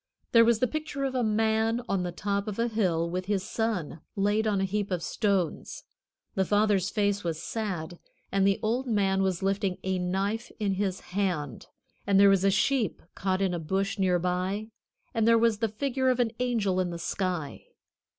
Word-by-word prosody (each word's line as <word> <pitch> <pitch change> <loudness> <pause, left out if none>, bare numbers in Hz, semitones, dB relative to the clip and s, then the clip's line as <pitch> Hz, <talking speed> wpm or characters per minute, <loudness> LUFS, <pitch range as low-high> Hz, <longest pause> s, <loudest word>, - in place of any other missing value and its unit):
There 230 -1 +7
was 230 -1 +4
the 255 - +2
picture 310 -1 -4
of 270 -1 -1
a 255 -2 +1
man 220 +2 +1
on 195 -2 0
the 180 0 -2
top 200 +3 -2
of 210 - -4
a 230 +1 +1
hill 185 -7 0
with 180 +2 -3
his 195 -1 0
son 205 -8 -2
laid 205 +2 +1
on 205 -2 +1
a - - +1
heap 200 +1 -1
of 180 -3 -2
stones. 195 -7 -1 0.5
The 190 - +1
father's 205 -1 +2
face 205 -1 0
was 165 -2 -2
sad, 175 -7 -4 0.3
and 195 0 +3
the 195 - +2
old 240 +4 0
man 195 -4 +2
was 190 -2 0
lifting 195 -1 0
a 190 -1 -1
knife 195 +6 -2
in 205 -2 +1
his 190 -1 -2
hand; 175 - -2 0.4
and 195 -1 +4
there 200 0 +8
was 195 -1 +3
a 195 - +5
sheep 215 - +1
caught 190 0 -1
in 185 -2 +1
a 175 - -2
bush 195 +5 -1
near 185 -2 +3
by; 185 +5 -2 0.4
and 225 -2 +1
there 230 0 +6
was 225 -2 +2
the 225 -1 +1
figure 260 +4 0
of 255 -1 +1
an 235 -2 +2
angel 220 -7 +1
in 180 -1 0
the 170 - -5
sky. 175 -3 -3
200 Hz, 200 wpm, -28 LUFS, 185-220 Hz, 0.5 s, there